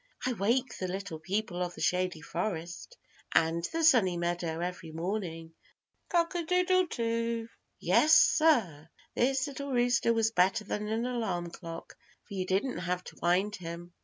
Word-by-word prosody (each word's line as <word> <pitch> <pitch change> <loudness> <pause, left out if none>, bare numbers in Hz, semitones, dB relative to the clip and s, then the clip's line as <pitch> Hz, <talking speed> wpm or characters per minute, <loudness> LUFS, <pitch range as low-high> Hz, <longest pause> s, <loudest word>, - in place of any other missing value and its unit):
I 255 - +1
wake 235 +5 0
the 185 - -2
Little 185 -3 -5
People 185 +2 -2
of 175 -1 -3
the - - -9
Shady 180 0 0
Forest 175 - -4 0.4
and 165 +1 +3
the 330 0 -1
Sunny 225 - +5
Meadow 170 -1 -2
every 175 -2 -5
morning. 165 -1 -4 0.6
Cock 335 -1 +1
a 350 - -1
doodle 360 +2 +2
do." 230 -2 -2 0.3
Yes, 310 +1 +5
sir. 200 - +4 0.2
This 260 +2 +1
little 280 -1 -6
rooster 245 -1 +2
was 225 -1 +2
better 195 +2 +2
than 210 +1 -3
an 225 +2 -1
alarm 220 -9 -2
clock, 165 -1 -9 0.3
for - - -12
you 185 -1 -2
didn't 200 +8 0
have 180 0 -2
to - - -11
wind 185 +5 +1
him. 170 0 -8
195 Hz, 160 wpm, -30 LUFS, 175-245 Hz, 0.6 s, Sunny